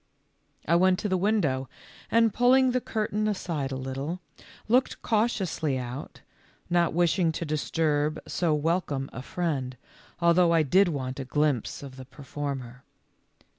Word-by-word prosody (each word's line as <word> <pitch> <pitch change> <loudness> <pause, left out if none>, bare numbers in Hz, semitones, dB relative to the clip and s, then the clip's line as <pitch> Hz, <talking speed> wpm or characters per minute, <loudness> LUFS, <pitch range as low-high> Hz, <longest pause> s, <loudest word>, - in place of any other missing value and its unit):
I 170 - +4
went 185 +1 +4
to 210 - -2
the 185 - +2
window, 175 -10 +1 0.4
and 230 -2 +3
pulling 255 +2 +4
the 250 0 0
cur 220 -2 -2
tain 215 +1 0
aside 165 -9 -2
a - - -2
little, 135 +6 -4 0.5
looked 250 +4 +2
cautiously 195 - 0
out, 125 +2 -7 0.5
not 175 -2 +2
wishing 170 0 +2
to 170 - -4
disturb 155 0 0
so 170 -3 0
welcome 150 -3 -1
a 125 - -6
friend, 135 -5 -3 0.4
although 170 0 +4
I 165 -1 +4
did 185 +7 +4
want 135 -5 -3
a - - -2
glimpse 145 -2 0
of 135 -2 -10
the 130 - -9
performer. 135 -2 -6
160 Hz, 145 wpm, -27 LUFS, 135-185 Hz, 0.5 s, I